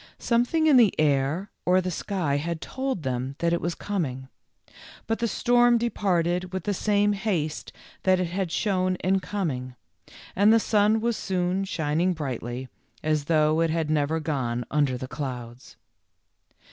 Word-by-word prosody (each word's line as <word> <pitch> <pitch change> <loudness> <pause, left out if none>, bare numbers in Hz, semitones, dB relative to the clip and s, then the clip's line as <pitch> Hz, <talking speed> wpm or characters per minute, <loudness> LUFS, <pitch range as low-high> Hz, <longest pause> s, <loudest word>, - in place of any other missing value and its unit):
Something 245 +7 +1
in 295 -4 +6
the 225 -9 +4
air 150 +6 +1
or 180 +1 +4
the 185 0 -2
sky 170 -5 -1
had 165 +3 -3
told 260 - -3
them 130 +1 -3
that 170 0 +1
it 170 - 0
was 170 0 -2
coming. 135 -10 -3 0.8
But 225 0 -1
the 235 - +1
storm 240 +2 +3
departed 180 -6 0
with 190 0 -4
the 205 - -1
same 205 +1 +2
haste 185 -7 -2 0.3
that 185 -1 +3
it 185 - +1
had 180 0 -3
shown 185 -2 0
in 190 +1 +2
coming, 140 -11 -3 0.6
and 205 +3 +5
the 225 - +6
sun 215 0 +2
was 235 0 0
soon 185 +1 -1
shin 160 -3 -1
ing 185 +1 +2
brightly, 130 -4 -5 0.4
as 155 -2 0
though 155 0 +3
it 165 - +2
had 160 -1 -1
never 155 +1 +1
gone 125 -6 -2
under 145 -4 +1
the 130 - -6
clouds. 125 -3 -7
175 Hz, 160 wpm, -26 LUFS, 145-205 Hz, 0.8 s, in